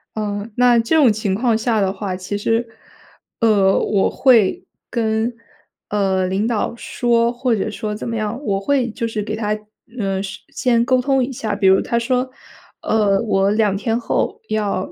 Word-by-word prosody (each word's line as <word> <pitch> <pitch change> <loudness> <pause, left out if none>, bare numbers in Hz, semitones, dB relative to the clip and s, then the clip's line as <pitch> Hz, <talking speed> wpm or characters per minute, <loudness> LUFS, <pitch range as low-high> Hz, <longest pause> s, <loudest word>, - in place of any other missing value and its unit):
嗯， 210 0 -3
那 245 -1 +5
这 230 +8 +1
种 280 -8 +6
情 205 -2 -1
况 230 0 +1
下 225 -1 0
的 190 0 0
话， 190 -2 -4
其 190 +2 -4
实， 230 +3 0 0.7
呃， 205 -4 +3
我 200 -2 +1
会 255 - +3 0.2
跟， 225 0 0 0.6
呃， 190 -2 +1
领 190 +4 0
导 230 -1 -1
说， 235 0 +1
或 245 -1 0
者 210 - -2
说 215 0 -4
怎 215 - -6
么 230 - -3
样。 215 +2 -3
我 195 -4 0
会 255 +3 0
就 230 +1 -3
是 225 -2 -3
给 215 +1 -4
他， 215 -1 -1 0.4
呃， 195 -2 -1
事 190 - -7
先 235 -3 +1
沟 255 +1 +2
通 270 0 +2
一 265 - -3
下， 220 -4 -3
比 200 -2 +2
如 190 0 +6
他 235 - -1
说： 250 +2 0 0.5
“呃， 205 -3 +2
我 200 -3 +1
2 210 -2 +1
天 225 +2 -1
后 - - -2
要 205 -3 -1
220 Hz, 190 characters per minute, -19 LUFS, 200-235 Hz, 0.7 s, 种